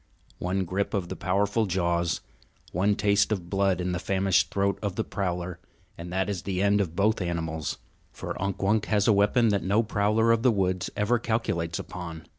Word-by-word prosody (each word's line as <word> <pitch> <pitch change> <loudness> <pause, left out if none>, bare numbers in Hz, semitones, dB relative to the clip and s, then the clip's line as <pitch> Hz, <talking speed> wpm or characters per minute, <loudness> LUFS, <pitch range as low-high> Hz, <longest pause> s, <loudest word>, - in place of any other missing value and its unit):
One 95 +1 -1
grip 100 +4 -2
of 90 -3 -2
the - - -4
powerful 100 +4 +1
jaws, 85 -2 0 0.5
one 100 +4 +2
taste 100 +1 +2
of 90 -5 -3
blood 95 -2 +2
in 90 0 -1
the 90 - -2
famished 95 0 +2
throat 100 0 0
of 100 -4 -2
the - - 0
prowler 90 -2 -3 0.4
and 85 +1 -8
that 95 0 0
is 100 -4 -3
the 95 0 -3
end 100 0 +3
of 85 -4 -3
both 105 +2 +2
animals. 80 -3 -3 0.3
For - - -5
Unk 100 0 -2
Wunk 105 +2 +2
has 105 -2 +2
a 110 - +6
weapon 105 +4 +3
that 100 -2 +1
no 100 +5 +2
prowler 110 +1 +2
of 115 -1 +3
the 125 - +4
woods 95 -4 0
ever 115 +4 +2
calculates 110 -7 -1
upon. 85 -3 -7
95 Hz, 195 wpm, -27 LUFS, 90-105 Hz, 0.5 s, a